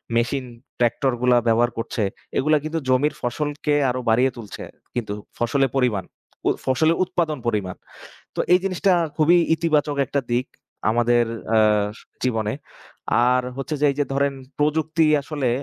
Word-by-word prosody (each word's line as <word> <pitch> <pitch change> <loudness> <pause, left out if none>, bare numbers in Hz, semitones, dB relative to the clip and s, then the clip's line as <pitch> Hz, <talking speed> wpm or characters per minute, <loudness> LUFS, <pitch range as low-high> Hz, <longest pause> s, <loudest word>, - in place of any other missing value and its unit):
Machine, 125 +3 0 0.3
ট্রাক্টরগুলা 120 0 +2
ব্যবহার 115 +1 +3
করছে, 115 -1 -2 0.3
এগুলা 155 +3 +3
কিন্তু 160 +1 -2
জমির 135 +4 +3
ফসলকে 145 +4 -2 0.2
আরো 130 - -1
বাড়িয়ে 125 +4 +3
তুলছে 110 -3 -8 0.3
কিন্তু, 110 -4 -2 0.2
ফসলের 130 +2 +1
পরিমাণ। 110 -8 +1 0.4
উ - - +5 0.2
ফসলের 160 +5 +2
উৎপাদন 170 -5 -1
পরিমাণ। 100 -5 -1 0.6
তো - - -5
এই 180 - +6
জিনিসটা 195 0 +1 0.3
খুবই 165 +3 +5 0.2
ইতিবাচক 155 -3 +1
একটা 140 - -1
দিক, 120 +2 +1 0.4
আমাদের 120 +1 +3 0.3
‍আ - - +5 0.7
জীবনে। 110 -4 0 0.8
আর 125 0 +3 0.2
হচ্ছে 135 +3 -3
যে - - +5
এই 140 - -7
যে 145 - +2
ধরেন, 140 0 +1 0.3
প্রযুক্তি 160 +2 +2 0.2
আসলে 140 -3 -2
130 Hz, 140 wpm, -22 LUFS, 120-150 Hz, 0.8 s, এই